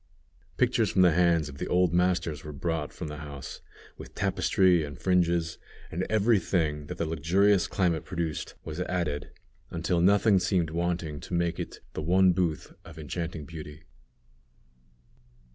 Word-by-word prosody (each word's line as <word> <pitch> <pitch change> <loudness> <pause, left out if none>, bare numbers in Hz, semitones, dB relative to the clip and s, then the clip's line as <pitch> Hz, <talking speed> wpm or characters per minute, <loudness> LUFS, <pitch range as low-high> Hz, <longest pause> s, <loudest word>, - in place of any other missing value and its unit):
Pictures 120 -3 +2
from 95 - +3
the 90 - +6
hands 85 -2 +3
of 70 -1 -10
the - - -3
old 90 -2 +2
masters 85 -4 +1
were 75 - -7
brought 80 +1 -3
from 80 - -7
the 75 0 -6
house, 70 -3 -8 0.4
with - - -11
tapestry 90 -3 +2
and 70 -3 -7
fringes; 85 -2 +1 0.3
and 90 +3 -2
every 110 0 +3
thing 75 -5 -1
that - - -6
the 85 - -1
luxurious 90 +5 +2
climate 85 -5 0
produced 85 -4 -4
was 80 +1 -6
added, 85 -6 -2 0.4
until 85 +1 0
nothing 100 +2 +5
seemed 90 -3 0
wanting 85 -3 -2
to 70 - -5
make 85 0 0
it - - -6
the - - -4
one 90 +3 +4
booth 85 -4 -2
of 80 -1 -13
enchanting 80 0 -5
beauty. 75 -1 -9
85 Hz, 155 wpm, -28 LUFS, 80-90 Hz, 0.4 s, the